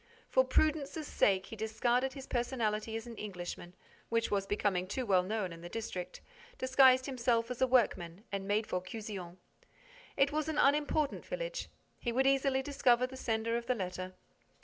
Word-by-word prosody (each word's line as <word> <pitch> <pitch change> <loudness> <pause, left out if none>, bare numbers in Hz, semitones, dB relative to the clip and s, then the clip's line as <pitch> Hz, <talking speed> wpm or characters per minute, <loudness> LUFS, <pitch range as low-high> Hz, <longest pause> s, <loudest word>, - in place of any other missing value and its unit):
For - - +5
prudence's 310 - +1
sake, 190 -8 +2
he - - -8
discarded 240 +4 0
his 270 -1 -8
personality 225 -3 -1
as 225 - -4
an 235 -1 -8
Englishman, 180 -3 -6 0.3
which 230 0 0
was 195 -1 0
becoming 195 -3 0
too 250 +6 -2
well 190 -4 +4
known 190 -1 -2
in 165 - -11
the 175 - -8
district, 185 -5 -5 0.4
disguised 260 0 +5
himself 240 -3 0
as 250 - -5
a 260 - +5
workman 205 -7 +1
and 195 -1 -3
made 210 +2 +1
for 180 - -2
Cuzion. 185 -3 -7 0.8
It 275 +1 +4
was 310 +1 -1
an 310 - -2
unimportant 295 +1 +2
village. - - -4 0.3
He 240 - -2
would 260 +3 +2
easily 270 0 +3
discover 255 -3 +3
the 260 +1 -8
sender 230 -2 -1
of 235 0 -6
the 250 - +2
letter. 185 -2 -5
230 Hz, 170 wpm, -33 LUFS, 200-265 Hz, 0.8 s, For